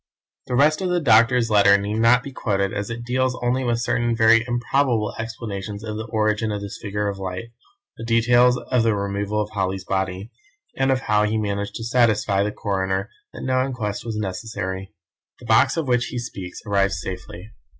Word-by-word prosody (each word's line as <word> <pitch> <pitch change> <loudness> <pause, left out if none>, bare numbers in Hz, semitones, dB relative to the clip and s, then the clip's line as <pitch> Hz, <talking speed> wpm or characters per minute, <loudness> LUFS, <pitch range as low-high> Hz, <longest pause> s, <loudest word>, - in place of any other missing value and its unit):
The 125 - -1
rest 150 +5 +3
of 185 - -1
the 180 0 +2
doctor's 115 -3 +4
letter 100 -1 +6
need 105 +2 -3
not 120 +2 +4
be 140 - -7
quoted 100 -6 -1
as 105 +1 -3
it 115 0 -5
deals 125 +1 0
only 125 +2 +1
with 120 -1 0
certain 120 0 0
very 115 0 +5
improbable 120 -2 0
explanations 105 -2 -5
of 110 -1 -5
the 110 +1 -5
origin 110 0 0
of 105 - -2
this 100 -1 -7
figure 105 -1 -2
of 100 -1 -4
light, 95 +4 -5 0.5
the - - -7
details 120 +2 +4
of 125 0 0
the 115 -2 +2
removal 100 +1 -2
of 105 0 -2
Holly's 95 -1 -2
body, 95 +3 -2 0.4
and 135 0 +1
of 130 -1 +1
how 105 -4 +2
he 110 +1 0
managed 100 -1 -2
to 115 - -5
satisfy 110 -4 +2
the 105 +1 0
coroner 95 0 -2 0.2
that - - -8
no 130 0 +1
inquest 115 -6 -3
was 115 -2 -4
necessary. 95 -1 -4 0.5
The - - -13
box - - +4
of 160 -4 -1
which 125 -1 +2
he - - -6
speaks 95 -7 -6
arrived 100 -1 +1
safely. 90 +3 -7
110 Hz, 190 wpm, -22 LUFS, 100-120 Hz, 0.5 s, letter